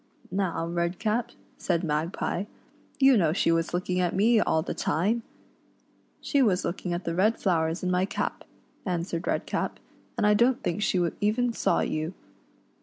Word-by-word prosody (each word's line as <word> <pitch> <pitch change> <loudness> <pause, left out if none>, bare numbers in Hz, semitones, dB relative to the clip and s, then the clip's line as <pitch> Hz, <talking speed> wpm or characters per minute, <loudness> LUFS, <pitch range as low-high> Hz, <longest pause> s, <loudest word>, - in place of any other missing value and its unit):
" - - -28
Now, 185 -3 -1
Redcap," 175 +7 -1 0.3
said 170 -2 0
Magpie, 165 +4 -1 0.3
" - - -32
you 270 -1 +6
know 165 -6 +3
she 165 - +2
was 165 0 +1
looking 180 +1 -1
at 175 -2 0
me 220 +4 +4
all 160 -6 +2
the - - -3
time 210 +8 0 0.5
!" - - -38
"She 280 - +1
was 200 -8 +2
looking 180 0 -3
at 175 +1 -2
the 165 - -2
red 210 +6 +2
flowers 165 -2 0
in 180 - 0
my 180 +1 +2
cap," 200 - -3 0.4
answered 175 -2 -3
Redcap, - - -1 0.4
"and - - +2
I 210 - +5
don't 245 +5 +3
think 175 +4 -1
she 180 -4 +2
even 230 +3 +1
saw - - +1
n - - -1
you. 155 +3 -2
180 Hz, 180 wpm, -27 LUFS, 170-210 Hz, 0.5 s, you